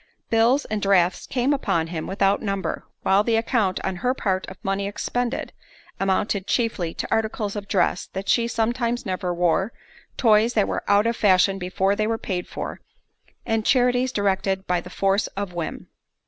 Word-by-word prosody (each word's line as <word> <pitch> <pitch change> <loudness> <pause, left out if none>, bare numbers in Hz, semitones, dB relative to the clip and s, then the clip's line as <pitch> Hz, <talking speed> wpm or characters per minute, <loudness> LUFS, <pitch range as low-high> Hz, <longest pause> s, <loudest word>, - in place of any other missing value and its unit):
Bills 235 +5 +3
and 215 -1 -3
drafts 190 -3 +2
came 260 +3 +1
upon 170 - 0
him 165 -1 -5
without 195 +1 +1
number, 195 -2 -3 0.2
while 195 +2 +4
the 230 +1 +1
account, 225 -4 +1
on 190 -1 -2
her 250 +7 0
part, 190 -6 -1
of 190 - -9
money 195 +1 -1
expended, 245 +4 -3 0.5
amounted 195 0 0
chiefly 220 -8 0
to - - -3
articles 220 -2 -1
of 205 -1 -5
dress 185 -2 +1
that 190 +1 -5
she 235 -1 +3
sometimes 235 +1 -1
never 185 -2 -2
wore, 175 +4 +1 0.5
toys 225 0 +4
that 210 -3 +3
were - - -2
out 205 +1 +4
of 230 0 +1
fashion 195 -1 +3
before 190 +2 0
they 215 0 0
were 225 0 0
paid 180 -5 -4
for, - - -6 0.6
and 225 -1 0
charities 250 +1 +3
directed 195 -2 0
by 180 -1 0
the 180 - -11
force 195 +2 +1
of 200 -3 -3
whim. 170 -2 -5
200 Hz, 175 wpm, -23 LUFS, 190-230 Hz, 0.6 s, while